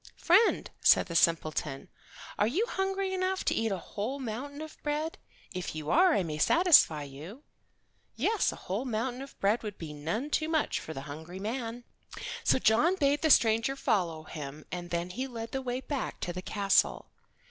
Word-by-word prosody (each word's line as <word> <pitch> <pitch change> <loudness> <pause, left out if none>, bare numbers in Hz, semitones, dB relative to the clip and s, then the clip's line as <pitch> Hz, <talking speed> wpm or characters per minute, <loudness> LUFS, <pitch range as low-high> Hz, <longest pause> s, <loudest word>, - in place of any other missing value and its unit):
"Friend," 380 +7 +4
said - - +6
the 170 - -7
simpleton, 155 -4 +1 0.5
"are 210 - +4
you 355 - +1
hungry 385 -2 -1
enough 375 0 -1
to - - +2
eat 225 -1 0
a 195 - -1
whole 215 +9 -4
mountain 270 +3 -5
of 315 0 -9
bread? 305 +2 -2 0.3
If 180 -3 -4
you 155 0 -3
are 360 +1 +5
I - - +2
may 155 -2 -4
satisfy 300 - +5
you." 155 - -10 0.7
Yes, 440 -2 +1
a - - -8
whole 195 +7 -4
mountain 245 +2 -2
of 275 - -11
bread 205 +4 +2
would 210 -3 -6
be 155 -3 -7
none 170 - -3
too 310 +1 0
much 315 -2 +1
for 160 - -8
the 135 - -5
hungry 160 +6 -8
man. 230 +3 -4 0.6
So - - +4
John 260 - +3
bade 285 -3 +2
the 315 - +2
stranger 230 0 +4
follow 170 -11 0
him 150 -1 -8
and 175 -1 -5
then 175 +1 -2
he 255 +7 -3
led 230 -3 -7
the 265 - -2
way 250 0 -3
back 280 -1 -4
to 175 - -3
the 180 - -5
castle. 200 +1 +1
225 Hz, 185 wpm, -30 LUFS, 175-290 Hz, 0.7 s, said